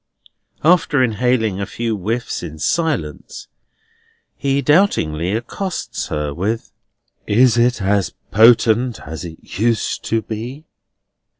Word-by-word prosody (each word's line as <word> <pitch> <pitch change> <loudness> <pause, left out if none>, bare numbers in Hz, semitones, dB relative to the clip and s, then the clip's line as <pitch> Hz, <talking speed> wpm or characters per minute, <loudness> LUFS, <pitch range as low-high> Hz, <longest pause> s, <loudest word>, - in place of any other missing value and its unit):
After 155 -4 +4
inhaling 110 -3 +1
a 100 - -3
few 115 -1 -2
whiffs 110 +5 -3
in 80 - -7
silence, 135 - -2 0.9
he 140 0 0
doubtingly 95 - +2
accosts 155 - -4
her 75 -1 -3
with: 105 +8 -3 0.6
"Is 115 +2 +4
it 120 -3 +2
as 100 -1 +1 0.2
potent 115 +2 +4
as 80 +4 -7
it 85 +2 -9
used 115 -1 0
to 115 -1 0
be?" 120 +8 -6
115 Hz, 110 wpm, -19 LUFS, 95-130 Hz, 0.9 s, After